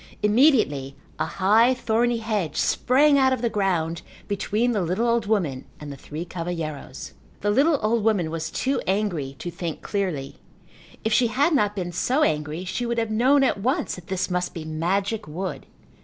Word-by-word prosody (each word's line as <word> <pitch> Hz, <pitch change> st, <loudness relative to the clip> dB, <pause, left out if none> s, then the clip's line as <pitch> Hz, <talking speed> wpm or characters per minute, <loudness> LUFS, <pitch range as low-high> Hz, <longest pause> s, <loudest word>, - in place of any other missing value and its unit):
Immediately 210 Hz, -, +3 dB, 0.2 s
a 155 Hz, -, 0 dB
high, 215 Hz, +10 st, +3 dB
thorny 240 Hz, 0 st, +1 dB
hedge 210 Hz, -9 st, -2 dB
sprang 280 Hz, +3 st, +3 dB
out 265 Hz, -1 st, +4 dB
of 250 Hz, -2 st, -3 dB
the 235 Hz, -, +1 dB
ground 170 Hz, -5 st, 0 dB, 0.3 s
between 210 Hz, +4 st, 0 dB
the 210 Hz, -4 st, 0 dB
little 185 Hz, +7 st, 0 dB
old 230 Hz, -2 st, +1 dB
woman 165 Hz, -12 st, 0 dB
and 150 Hz, -1 st, -7 dB
the -, -, -7 dB
three 150 Hz, +5 st, -7 dB
cavalheiros. 165 Hz, -6 st, -5 dB, 0.3 s
The 205 Hz, -, +1 dB
little 285 Hz, +7 st, +4 dB
old 220 Hz, 0 st, +1 dB
woman 200 Hz, -8 st, +1 dB
was 165 Hz, 0 st, -3 dB
too 270 Hz, +1 st, -1 dB
angry 180 Hz, -9 st, -1 dB
to 175 Hz, -, -5 dB
think 170 Hz, -2 st, -5 dB
clearly. 180 Hz, -10 st, -3 dB, 0.7 s
If 220 Hz, -, 0 dB
she 240 Hz, +1 st, +4 dB
had 280 Hz, +9 st, +2 dB
not 210 Hz, -7 st, +2 dB
been 180 Hz, -3 st, -3 dB
so 260 Hz, -, +1 dB
angry 155 Hz, -, -1 dB
she 240 Hz, +6 st, -3 dB
would 235 Hz, 0 st, -2 dB
have 225 Hz, -1 st, -1 dB
known 260 Hz, +6 st, +4 dB
at 255 Hz, -, +1 dB
once 255 Hz, +7 st, 0 dB
that 180 Hz, -1 st, -10 dB
this 190 Hz, 0 st, -2 dB
must 180 Hz, +1 st, -2 dB
be 160 Hz, -2 st, -6 dB
magic 190 Hz, +6 st, -1 dB
wood. 180 Hz, +5 st, -5 dB
200 Hz, 180 wpm, -24 LUFS, 165-235 Hz, 0.7 s, out